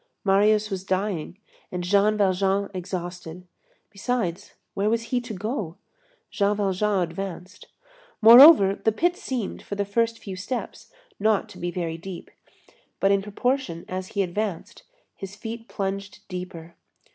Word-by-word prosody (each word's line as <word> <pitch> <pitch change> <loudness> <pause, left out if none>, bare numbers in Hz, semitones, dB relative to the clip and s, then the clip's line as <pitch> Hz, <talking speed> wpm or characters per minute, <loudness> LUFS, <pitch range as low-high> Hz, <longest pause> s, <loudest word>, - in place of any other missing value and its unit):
Marius 210 +2 +3
was 190 -1 -3
dying, 190 -2 -2 0.3
and 180 -1 -3
Jean 200 +3 +3
Valjean 195 0 +1
exhausted. 180 -1 -6 0.5
Besides, 200 -3 -3 0.2
where 200 +2 0
was 230 +1 0
he 245 - +2
to 240 -2 -7
go? 205 - -4 0.5
Jean 205 0 +1
Valjean 200 -1 +1
advanced. 180 +1 -7 0.5
Moreover, 230 -2 +9
the 220 - +4
pit 345 +10 +1
seemed, 255 - -4
for 200 - -6
the 200 0 -1
first 230 +3 0
few 195 -4 -7
steps, 235 +7 -6 0.3
not 215 0 +2
to 195 - -12
be 175 - -2
very 170 -2 -4
deep. 180 0 -9 0.7
But 195 - +3
in 200 0 +3
proportion 210 -2 -2
as 185 0 -4
he 200 - +4
advanced, 195 0 -4 0.3
his 195 0 -8
feet 225 +2 -7
plunged 200 +1 -5
deeper. 180 -3 -7
195 Hz, 140 wpm, -25 LUFS, 185-215 Hz, 0.7 s, Moreover